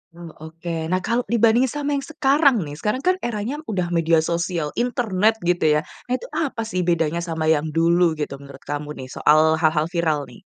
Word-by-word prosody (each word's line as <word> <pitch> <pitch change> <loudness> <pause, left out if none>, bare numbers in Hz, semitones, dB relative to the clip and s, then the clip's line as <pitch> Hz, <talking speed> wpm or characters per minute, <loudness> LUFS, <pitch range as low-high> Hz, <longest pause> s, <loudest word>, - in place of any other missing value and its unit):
Oh, 170 -2 -10
oke. 160 +1 -5
Nah, 185 +1 -1
kalau 235 +2 0
dibandingin 235 +2 +3
sama 290 +2 -3
yang 280 -1 -1
sekarang 280 - +3
nih, 145 0 -8
sekarang 235 +6 -2
kan 365 +1 +3
eranya 240 - -3
udah 180 -4 -2
media 165 -1 +2
sosial, 170 -2 -2
internet, 225 -4 +1
gitu 170 -3 +2
ya. 150 - +3 0.3
Itu 255 - -2
apa 270 -7 -2
sih 210 -5 -3
bedanya 165 -1 +1
sama 165 -2 -3
yang 155 0 +1
dulu 170 0 +3
gitu, 145 -2 -5
menurut 140 -1 -13
kamu 145 +1 -5
nih, 130 - -8
soal 160 +1 +3
hal-hal 155 -1 +2
viral, 160 -4 0
nih? - - -14
170 Hz, 190 wpm, -22 LUFS, 160-230 Hz, 0.3 s, dibandingin